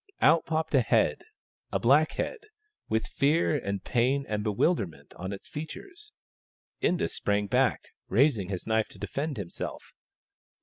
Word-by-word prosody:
Out 165 +1 +4
popped 160 0 -1
a 135 - +6
head 110 - +2 0.2
— - - -55
a - - +2
black 145 +6 +4
head, - - -3 0.5
with 110 0 +1
fear 155 +2 +2
and 100 -8 -2
pain 130 +3 +1
and 105 -1 -2
bewilderment 100 - 0
on 95 +2 -6
its 100 - -7
features. 355 - -8 0.7
Inda 175 - +2
sprang 105 0 0
back, 100 - +1 0.2
raising 110 -4 +3
his 95 -3 -4
knife 110 -1 +1
to - - -15
defend 145 0 -3
himself. 95 -5 -6
125 Hz, 145 wpm, -28 LUFS, 100-155 Hz, 0.7 s, a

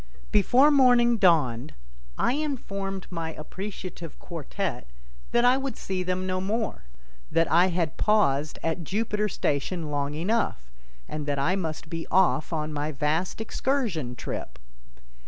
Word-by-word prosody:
Before 250 +8 +5
morning 245 -4 +5
dawned 150 - +3 0.4
I - - +2
informed 200 -10 -3
my 165 -2 -3
appreciative 185 0 -7
quartette 165 - -4 0.4
that 240 0 +4
I 250 +1 +5
would 270 -1 -4
see 190 -1 -3
them 185 0 -1
no 185 0 -1
more, 215 - -2 0.4
that 165 0 +2
I 175 +3 +6
had 170 -4 -1
paused 155 -9 +2
at 165 +1 -1
Jupiter 210 +4 -1
station 155 0 -1
long 145 0 -1
enough, 165 - -1 0.4
and 150 -1 -5
that 145 -1 0
I 165 +7 +2
must 165 -4 -4
be 165 +1 -5
off 185 -4 +3
on 155 -1 -2
my 150 +1 -2
vast 155 +8 -1
excursion 220 - -1
trip. - - -6
180 Hz, 135 wpm, -26 LUFS, 155-210 Hz, 0.4 s, I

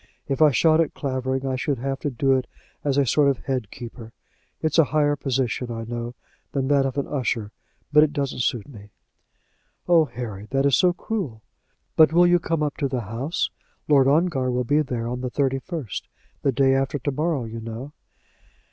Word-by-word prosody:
If 140 +1 -2
I 155 - +8
shot 155 +3 +4
at 160 - -2
Clavering 130 -1 -2
I 130 -1 0
should 135 +1 -1
have 135 +2 -3
to 145 - -2
do 135 +1 +2
it 130 -2 0 0.4
as 140 -2 0
a 140 - +4
sort 145 +3 +3
of 135 - +1
head 130 -6 -2
keeper. 115 -1 -10 0.5
It's 155 +1 +1
a 160 - +7
higher 145 +1 +2
position, 130 -3 -1
I 115 -1 -4
know, 120 +1 -5 0.4
than 135 -1 -1
that 140 -2 +3
of 135 +1 -5
an 140 - 0
usher, 120 -6 -2 0.4
but 150 - +8
it 155 -1 +3
doesn't 140 -3 -2
suit 120 -3 -1
me." 105 -7 -12 1.0
"Oh, 170 -2 +5
Harry! 115 -5 -7
that 135 0 +1
is 140 - +5
so 180 - +4
cruel! 175 - -4 0.5
But 160 0 +6
you - - +1
will 175 0 +6
come 165 -2 -1
up 145 -2 -2
to 140 - 0
the 130 -2 -2
house. 115 - -2 0.4
Lord 140 -3 +5
Ongar 145 -3 +2
will 125 0 0
be 145 +5 +2
there 125 -5 -3
on 125 +1 -3
the 130 - -2
thirty 135 0 0
first; 155 - -5 0.3
the 140 - +2
day 135 +1 +3
after 135 +2 0
to 145 +2 -2
morrow, 150 -1 -1
you 115 +1 -6
know." 115 +6 -7
135 Hz, 200 wpm, -24 LUFS, 125-150 Hz, 1.0 s, I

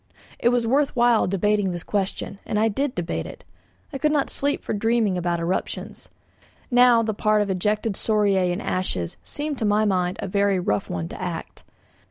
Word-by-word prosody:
It 240 - +3
was 245 -1 +1
worth 275 +5 +1
while 240 -2 +4
debating 200 +1 +1
this 175 -1 -4
question, 200 0 -3
and 210 - -2
I 225 +1 +3
did 270 +5 -2
debate 175 -1 -3
it. - - -11 0.5
I 275 - -4
could 305 +1 +2
not 290 -2 +1
sleep 285 +1 0
for - - -3
dreaming 225 -2 +1
about 175 -1 -1
eruptions. 170 +3 -4 0.6
Now, 245 -1 +6
the 220 -1 -1
part 210 +1 +2
of 200 - -3
ejected 210 +3 0
scoriae 200 -3 +1
and 190 +6 -3
ashes 90 - -2
seemed 290 -1 -4
to - - -2
my 210 +1 +3
mind 185 -3 0
a - - -3
very 200 0 +2
rough 105 - -1
one 85 -2 -3
to - - -8
act. - - -6
210 Hz, 190 wpm, -23 LUFS, 185-235 Hz, 0.6 s, Now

